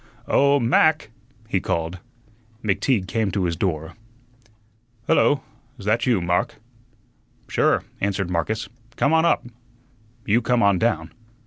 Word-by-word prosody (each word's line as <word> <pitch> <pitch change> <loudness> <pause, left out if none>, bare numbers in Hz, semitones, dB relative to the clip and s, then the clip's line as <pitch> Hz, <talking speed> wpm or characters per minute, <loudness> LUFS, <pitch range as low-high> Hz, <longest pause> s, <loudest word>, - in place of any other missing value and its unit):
"Oh, 140 +1 +4
Mac!" 140 +2 +2 0.4
he 100 -4 0
called. 85 +1 -3 0.6
McTeague 105 0 +1
came 110 +1 0
to 95 0 -1
his 85 -2 0
door. 80 -3 -2 1.1
"Hullo! 145 -3 +3 0.4
'sthat 110 +4 0
you, 120 -6 +3
Mark?" 90 0 0 0.9
"Sure," - - +2 0.2
answered 95 -2 -1
Marcus. 100 +6 -1 0.3
"Come 140 - +2
on 160 +1 +4
up." - - +2 0.8
"You 110 +4 +3
come 125 -1 +1
on 100 -2 +3
down." 85 -8 0
100 Hz, 120 wpm, -23 LUFS, 90-120 Hz, 1.1 s, Oh